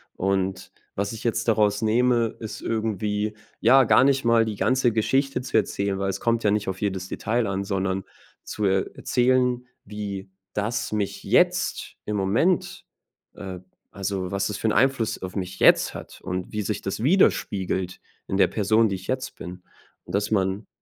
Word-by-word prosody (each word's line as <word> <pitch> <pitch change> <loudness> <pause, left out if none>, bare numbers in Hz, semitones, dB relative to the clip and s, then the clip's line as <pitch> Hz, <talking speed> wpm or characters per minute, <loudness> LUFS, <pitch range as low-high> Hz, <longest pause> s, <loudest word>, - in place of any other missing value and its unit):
und 95 0 -1 0.2
was 100 +3 -2
ich 110 - -8
jetzt 115 0 -1
daraus 105 -2 +2
nehme, 115 +1 +2
ist 110 -2 -6
irgendwie, 105 -1 -1 0.3
ja, 135 0 +6
gar 120 - +5
nicht 135 -2 +2
mal 115 -1 +5
die 110 -2 -4
ganze 130 +1 +2
Geschichte 135 +5 +1
zu 125 - -6
erzählen, 100 -2 +1
weil 95 0 -1
es 95 - -3
kommt 115 -1 0
ja 105 - +3
nicht 105 0 0
auf 95 0 -4
jedes 95 -3 -2
Detail 115 +3 -1
an, 100 0 -2
sondern 95 -1 -1 0.4
zu 105 - -3
er 95 -1 +1
erzählen, 125 0 +2 0.2
wie 100 -2 -6 0.2
das 110 +4 -2
mich 105 -2 -2
jetzt - - +1
im 105 - -2
Moment, 110 - +1 0.5
äh 95 -2 -7 0.3
also, 95 -1 -3
was 100 +1 -1
das 105 - -4
für - - -1
'n - - +3
Einfluss 120 -2 +1
auf 95 -1 -6
mich 95 -1 -4
jetzt - - +5
hat - - -10
und 90 0 -4
wie 105 - -1
sich 105 0 -3
das 95 +2 -3
widerspiegelt 95 - +1 0.3
in 95 - -1
der 100 - +6
Person, 110 +2 +2
die 100 - -2
ich 95 0 -9
jetzt 130 0 -3
bin. 90 0 -9 0.4
Dass 100 +2 -1
man 95 0 0
105 Hz, 175 wpm, -24 LUFS, 95-115 Hz, 0.5 s, ja